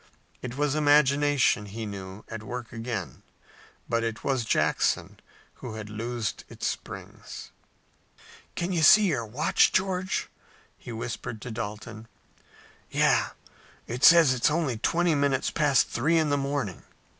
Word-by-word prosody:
It 125 0 -6
was 145 -1 +1
imagination, 145 -6 +3
he 110 +3 -6
knew, 95 0 -8
at 115 -1 -7
work 120 +2 -7
again, 115 - -5 0.7
but 115 0 0
it 115 -1 -4
was 130 -3 0
Jackson - - 0 0.4
who 115 -3 -6
had 110 -1 -7
loosed 115 0 -4
its - - -7
springs. - - -7 1.0
"Can 175 +2 -2
you 170 - +1
see 210 +6 +8
your 115 -8 -2
watch, 125 +8 +2
George?" 185 0 -1 0.5
he - - -10
whispered 115 0 -5
to 125 - -6
Dalton. 110 0 -6 0.8
"Yes, - - +2 0.5
and 115 - -4
its 125 - +7
says 155 -8 +6
only 150 -7 -1
twenty 170 +6 +2
minutes 140 -2 +1
past 145 -5 +2
three 155 +8 +1
in 155 -2 +1
the - - +3
morning." 140 -8 -3
125 Hz, 135 wpm, -27 LUFS, 110-145 Hz, 1.0 s, see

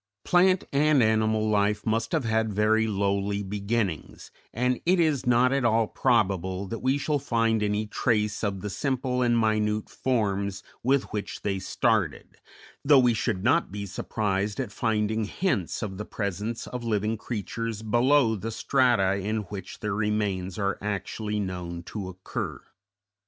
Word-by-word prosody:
Plant 185 +1 +4
and 145 -2 +4
animal 110 0 +2
life 105 0 +1
must 115 +1 0
have 160 -4 +1
had 110 -1 +1
very 110 +2 +2
lowly 100 0 0
beginnings, 100 -3 -3 0.2
and 125 +2 0
it 180 +1 +3
is 155 -7 +1
not 125 +2 +4
at 140 -1 +1
all 115 -1 +3
probable 95 -6 +1
that 115 - -4
we 130 +2 +1
shall 145 +1 0
find 115 -4 +1
any 105 +1 0
trace 105 -1 0
of 100 -3 -1
the 105 - -4
simple 130 0 -1
and 120 -1 +3
minute 110 -1 0
forms 100 -6 -1 0.2
with 135 +2 +2
which 105 -1 -4
they 100 -2 -1
started, 95 - -1 0.4
though 145 0 +6
we 125 -2 +5
should 105 -4 -1
not 140 - +2
be 100 0 -5
surprised 100 +1 -2
at 125 -6 -3
finding 110 0 0
hints 105 - -1
of 95 -2 -5
the - - -2
presence 105 +3 -3
of 125 -1 -6
living 110 -1 0
creatures 115 0 -4
below 120 +2 +3
the 110 +2 -4
strata 115 -5 +2
in 110 +2 -1
which 95 -2 -7
their 105 -2 -1
remains 100 -3 -1
are 100 -2 -1
actually 105 +1 -3
known 90 -3 -4
to 95 0 -6
occur. 95 0 -5
110 Hz, 155 wpm, -26 LUFS, 100-120 Hz, 0.4 s, though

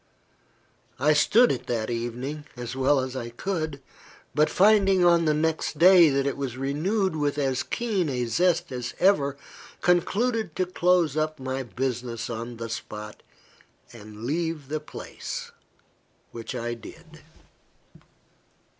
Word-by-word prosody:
I 150 +3 +4
stood 225 +11 +5
it - - -4
that 115 -1 -2
evening, 125 +6 -4
as 120 +1 -5
well 135 +2 +3
as 130 0 -5
I 120 -2 -4
could; 155 +2 -3 0.5
but 150 +1 +3
finding, 195 -2 +4
on 170 -1 +5
the 155 - +3
next 160 0 -1
day, 175 0 +8
that 135 0 +1
it 140 - -1
was 130 -3 -4
renewed 165 +8 0
with 145 -1 -1
as 135 -3 0
keen 200 - -1
a 125 -2 -1
zest 170 +6 +1
as 125 -1 -5
ever, 145 -8 +3 0.4
concluded 200 +2 +1
to 185 - +1
close 180 -3 +2
up 155 -1 -1
my 130 0 -3
business 125 -2 -3
on 115 +1 -6
the 115 0 -5
spot, 105 -2 -7 0.7
and 105 -1 -11
leave 160 0 -2
the 155 +1 -1
place 150 - -7 0.8
which 115 +2 -7
I 120 -1 -3
did. 160 +7 -13
145 Hz, 135 wpm, -26 LUFS, 125-170 Hz, 0.8 s, day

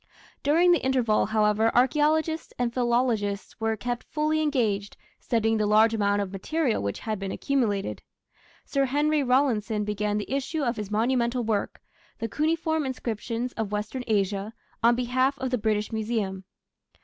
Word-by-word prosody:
During 335 +5 +4
the 345 - +3
interval, 250 -6 +2
however, 215 +1 +2
archaeologists 305 +5 +2
and 240 -1 -1
philologists 235 -5 0
were 225 0 0
kept 240 +3 -3
fully 310 +1 -1
engaged 220 -9 0 0.2
studying 225 -1 +1
the 210 -1 +1
large 215 +2 +5
amount 205 -1 +1
of 190 - -7
material 255 - -1
which 100 0 -3
had 215 -3 -3
been 195 -1 -4
accumulated. 225 -8 -1 0.6
Sir 275 -1 +1
Henry 295 +3 +1
Rawlinson 240 -5 +1
began 210 0 -1
the 210 - -4
issue 280 +3 -1
of 235 -2 -1
his 210 -2 -5
monumental 235 +2 +1
work 215 -3 -2 0.3
The 230 - -3
Cuneiform 315 - 0
Inscriptions 240 -2 -3
of 220 -2 -3
Western 210 +5 -3
Asia 200 0 0 0.3
on 235 +1 +5
behalf 255 +3 +1
of 260 -2 -3
the 250 - +1
British 210 0 0
Museum. 215 -4 -2
230 Hz, 150 wpm, -26 LUFS, 210-265 Hz, 0.6 s, large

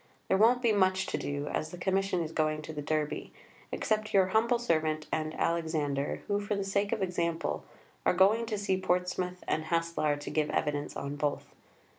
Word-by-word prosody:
There 190 - +4
won't 240 +4 +5
be 235 - +4
much 190 -2 +3
to - - -2
do, 145 0 -3
as 155 - -2
the 180 - -8
Commission 190 -1 +1
is 160 - -5
going 155 -1 0
to 160 - -7
the 150 - -4
Derby, 155 0 -2 0.4
except 215 -1 -1
your 190 -1 +5
humble 230 +4 +3
servant 155 -9 0
and 155 0 -2
Alexander, 155 -4 0
who, 205 0 +1
for 205 0 -2
the 200 - -1
sake 200 +1 0
of 205 - 0
example, 170 -2 -1 0.4
are - - +3
going 210 +5 +4
to 215 -2 -2
see 190 -2 0
Portsmouth 180 0 -1
and 155 0 0
Haslar 165 -2 +1
to 145 - -6
give 155 -1 +1
evidence 145 -1 -1
on 140 +1 -4
both. 145 -1 -1
175 Hz, 190 wpm, -30 LUFS, 155-200 Hz, 0.4 s, won't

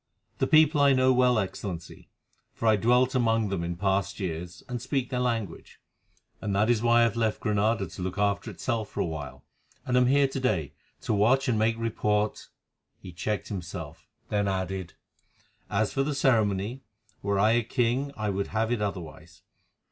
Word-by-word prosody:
"The - - +2
people 155 -1 +5
I 140 -1 +6
know 130 0 +4
well, 125 -1 +3
Excellency, 95 -4 -5 0.5
for 115 - -2
I 110 - +6
dwelt 125 +5 +3
among 115 -4 +2
them 95 -3 -2
in 85 0 -3
past 95 +2 -1
years 85 -2 -5
and 125 -2 -4
speak 130 0 -2
their 125 - -1
language; 115 -8 -3 0.6
and 100 -2 -2
that 105 +4 +3
is 115 -3 +1
why 120 0 +4
I - - +6
have 115 -1 +1
left 110 -2 0
Granada 105 0 +1
to 90 +2 -9
look 90 +1 -4
after 100 +2 0
itself 110 +1 -3
for - - -7
a - - +1
while, 75 -5 -6 0.4
and 125 - 0
am 125 0 +4
here 140 +1 +4
to 135 0 -4
day, 95 - -1 0.3
to - - -1
watch 125 +7 +3
and 115 -4 +1
make 115 +1 +2
report——" 105 -2 -1 0.5
He 90 - -10
checked 105 +5 -3
himself, 85 -5 -7 0.2
then 105 -1 0
added, 95 -2 -3 0.7
"As 105 +1 0
for 135 - +1
the 145 +1 -1
ceremony, 110 -2 +1 0.4
were 100 0 0
I 105 +3 +4
a 120 +1 +3
king 125 +4 0
I 105 -1 -1
would 100 +1 -2
have 110 +1 -1
it 120 -3 0
otherwise. 100 -5 -6
110 Hz, 185 wpm, -27 LUFS, 95-125 Hz, 0.7 s, I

